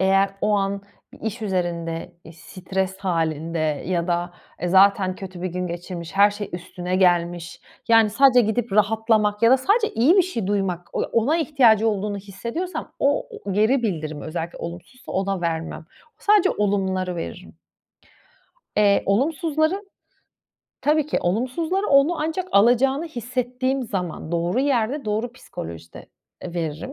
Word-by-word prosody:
eğer 195 +1 +3
o 210 - +1
an 200 0 -1 0.3
bir - - -16
iş 225 +2 -4
üzerinde, 170 -4 -2
eee, 160 - -12
stres 190 +3 -4
halinde 165 -3 -1 0.3
ya 175 -1 0
da, 175 0 -1 0.3
e, 175 - -2
zaten 190 0 +4
kötü 185 -2 -8
bir 185 - -1
gün 180 +1 -3
geçirmiş, 170 -1 -6
her 205 +1 +6
şey 205 0 -6
üstüne 180 +1 -4
gelmiş, 175 -2 +1 0.3
yani, 225 -2 +5
sadece 250 +2 +5
gidip 220 0 -1
rahatlamak 215 0 +2
ya 230 - +6
da 260 - +7
sadece 420 - +2
iyi 255 - +4
bir 380 - +6
şey 235 - -3
duymak, 185 -4 -2
on - - 0
ona 240 +8 +2
ihtiyacı 240 -9 +4
olduğunu 205 -1 -2
hissediyorsam 235 - -5
o 285 +1 +1 0.2
o 200 - -3
geri 220 +6 +2
bildirim 155 -8 -3
özellikle 165 +1 -5
olumsuzsa 175 +9 -9
ona 195 -1 -1
vermem. 165 -1 -3 0.3
Sadece 420 -2 +4
olumları 190 -3 -1
veririm. 165 - -7 1.2
Eee, 200 -1 +4
olumsuzların, 315 - 0 0.9
tabii 300 0 +2
ki - - 0
olumsuzları 260 - -1
onun 280 +5 +4
ancak 325 +4 -2
alacağını 250 +8 +4
hissettiğim 255 0 -2
zaman 180 -7 -4
doğru 175 +7 0
yerde, 270 0 0
doğru 220 +3 -2
psikolojide, 85 - -9 0.4
eee, 170 - -7
veririm. 165 - -4
205 Hz, 145 wpm, -23 LUFS, 180-255 Hz, 1.2 s, da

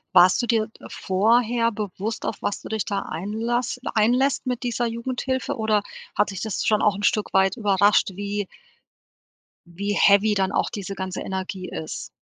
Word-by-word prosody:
Warst 180 +6 +7
du - - -1
dir, 225 -1 +1
äh, - - -13
vorher 230 +4 +2
bewusst, 210 +1 -4
auf - - -2
was 205 - -2
du - - -9
dich 220 -2 -2
da 200 -2 -1
einlasst 225 +8 -2
einlässt 250 +7 +2
mit 250 -1 -2
dieser 240 0 -1
Jugendhilfe 260 +4 -2
oder 215 -2 +1 0.3
hat 210 0 +2
dich 190 - -6
das 220 -2 -2
schon 215 -1 +3
auch 205 -2 +3
'n 205 - -6
Stück 215 0 +1
weit 190 +2 +3
überrascht, 205 -2 +3
wie 205 0 -3 1.2
wie 200 +4 -3
heavy 205 +1 +5
dann 190 -1 +1
auch - - 0
diese 200 -1 -5
ganze 190 -1 -4
Energie 190 -1 -4
ist? 155 - -6
210 Hz, 170 wpm, -24 LUFS, 195-230 Hz, 1.2 s, Warst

